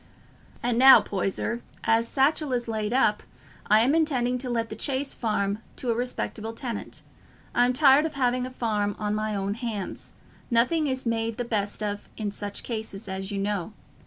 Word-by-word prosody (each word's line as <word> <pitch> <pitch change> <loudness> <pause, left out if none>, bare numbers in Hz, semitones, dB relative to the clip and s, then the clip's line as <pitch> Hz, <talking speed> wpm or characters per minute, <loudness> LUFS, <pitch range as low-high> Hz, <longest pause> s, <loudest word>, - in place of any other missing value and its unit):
"And 240 -1 +1
now, 265 +1 +10
Poyser, 200 +4 -2 0.2
as 230 +1 +3
Satchell 280 +2 +1
is 240 -1 -1
laid 215 -1 -2
up, 225 -5 +3 0.5
I 215 +1 +6
am 260 +5 +3
intending 255 -6 +1
to 255 0 -4
let 230 -1 -1
the 215 - -6
Chase 275 +4 -1
Farm 210 -3 -1 0.2
to 245 - -2
a - - +2
respectable 225 -2 -3
tenant. 230 -2 -6 0.5
I'm 245 +1 +4
tired 275 +3 +5
of 310 - -10
having 250 -1 +1
a - - -7
farm 210 -5 -1
on 210 -1 -2
my 215 0 -1
own 200 0 -1
hands—nothing 235 - -2
is 260 -1 -2
made 230 -1 -1
the 245 - -2
best 210 -2 -2
of 205 -1 -4
in 210 -2 -2
such 205 0 -5
cases, 220 -3 -5
as 190 0 -4
you 200 - -3
know. 200 -1 -2
230 Hz, 175 wpm, -26 LUFS, 210-255 Hz, 0.5 s, now